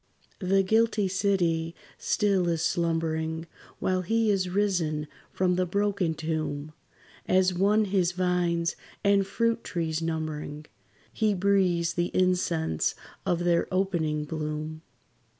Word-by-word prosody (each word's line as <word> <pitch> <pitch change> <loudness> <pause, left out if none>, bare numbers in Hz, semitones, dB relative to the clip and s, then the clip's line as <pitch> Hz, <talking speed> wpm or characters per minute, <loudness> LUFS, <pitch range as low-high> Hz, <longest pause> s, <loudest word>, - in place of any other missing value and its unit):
The 195 0 +2
guilty 220 0 +2
city 180 -4 0 0.2
still 200 -4 +1
is 165 -2 0
slumbering, 160 -1 -1 0.3
While 185 0 0
he 225 +4 +2
is 185 -2 0
risen 175 -6 0 0.2
from 180 -1 +1
the 185 0 +1
broken 200 -3 0
tomb; 155 -1 -3 0.5
As 185 0 +3
one 205 +4 +3
his 185 -3 +1
vines 175 -2 0 0.3
and 200 -1 +3
fruit 230 +1 0
trees 160 -2 -2
numbering, 155 -2 -4 0.5
He 215 -2 +1
breathes 180 -3 +2
the 175 0 0
incense 180 - +1 0.3
of 175 0 +1
their 170 -1 +2
opening 170 -6 0
bloom. 155 0 -4
175 Hz, 115 wpm, -27 LUFS, 160-195 Hz, 0.5 s, As